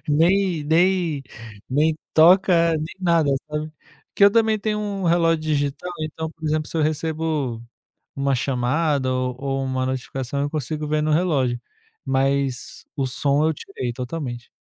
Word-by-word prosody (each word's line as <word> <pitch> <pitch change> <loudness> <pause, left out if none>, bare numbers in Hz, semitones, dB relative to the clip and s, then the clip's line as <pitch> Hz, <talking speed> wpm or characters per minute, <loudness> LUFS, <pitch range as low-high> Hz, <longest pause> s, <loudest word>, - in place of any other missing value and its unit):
nem 170 +1 +2
nem 165 -2 +2 0.5
nem 150 +4 +2 0.2
toca, 170 0 +6
nem 155 +1 -5
nada 170 -5 +2 0.2
sabe, 150 +1 -3 0.4
que 200 - +5
eu 200 - +8
também 220 -1 +3
tenho 210 0 -1
um 200 -3 -3
relógio 165 -1 +3
digital, 150 +3 -1
então 155 +1 -4
por 160 - -24
exemplo 155 0 0
se - - -11
eu - - +2
recebo 155 -5 -1 0.5
uma 140 0 +1
chamada 130 +2 0
ou 130 +2 -2
uma 130 -1 -1
notificação 130 +1 -3
eu 145 - 0
consigo 150 0 -3
ver 150 0 +1
no 155 0 +1
relógio, 140 -8 +1 0.4
mas 135 -1 -1
o 135 -2 0
som 140 +3 +1
eu 160 - +2
tirei 130 -8 -5
totalmente. 125 -1 -5
150 Hz, 150 wpm, -22 LUFS, 135-165 Hz, 0.5 s, eu